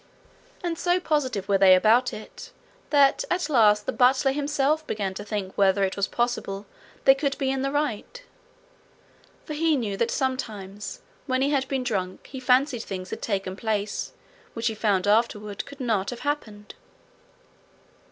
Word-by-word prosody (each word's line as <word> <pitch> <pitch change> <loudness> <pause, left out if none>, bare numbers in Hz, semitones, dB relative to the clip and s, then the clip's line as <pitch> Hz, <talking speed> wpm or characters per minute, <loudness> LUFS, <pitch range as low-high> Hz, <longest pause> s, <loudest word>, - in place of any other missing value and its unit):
And 335 -2 -2
so 355 0 +2
positive 260 - -1
were 200 -1 +2
they 190 -1 +8
about 225 +6 +4
it, 215 - -10 0.4
that 280 -2 +4
at 355 -3 -1
last 210 -5 +4
the - - -1
butler 260 +2 +3
himself 295 +2 0
began 200 -3 -2
to 205 - -7
think 205 -2 -4
whether 195 0 +3
it 190 - 0
was 200 -1 0
possible 225 -5 -2 0.4
they 270 - +9
could 275 0 -2
be 265 -1 0
in 270 -1 -1
the 275 - 0
right. 290 - -3 1.2
For 305 - -5
he 315 0 +2
knew 215 -6 -2
that 235 +2 +1
sometimes 210 -7 -4 0.3
when 260 0 +1
he 280 - +1
had 270 -2 +1
been 265 -1 -1
drunk 190 -6 -3
he 265 - -8
fancied 255 0 +2
things 185 -3 -6
had - - -5
taken 195 -3 -2
place 210 -1 -2 0.4
which 230 0 -4
he 225 - +2
found 205 -3 +1
afterward 210 -1 0
could 280 0 -12
not 220 -6 0
have 245 - -6
happened. 220 -8 -4
235 Hz, 165 wpm, -25 LUFS, 205-275 Hz, 1.2 s, they